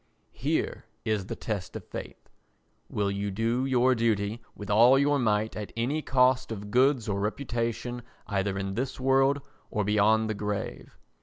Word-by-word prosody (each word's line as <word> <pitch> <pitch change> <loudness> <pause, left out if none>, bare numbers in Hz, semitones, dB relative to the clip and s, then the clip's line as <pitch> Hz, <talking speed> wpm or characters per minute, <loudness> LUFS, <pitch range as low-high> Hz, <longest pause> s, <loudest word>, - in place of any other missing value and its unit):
Here - - -1 0.2
is 105 -3 0
the - - -4
test 100 -5 -4
of - - -6
faith—will 100 -1 -7
you 100 +1 -2
do 115 +6 0
your 130 0 +4
duty 110 -1 0
with 105 0 -6
all 120 +6 +7
your 145 +1 +3
might 110 -2 +1
at 105 -1 -5
any 135 +7 0
cost 130 -2 +3
of 105 -1 -6
goods 130 -1 +3
or 100 -2 -1
reputation 120 +2 -2 0.2
either 100 -1 -1
in 95 0 -3
this 130 +6 -3
world 135 +2 +3 0.3
or 105 - -1
beyond 105 +2 +3
the 110 - -1
grave? 105 -1 -4
110 Hz, 155 wpm, -28 LUFS, 105-125 Hz, 0.3 s, all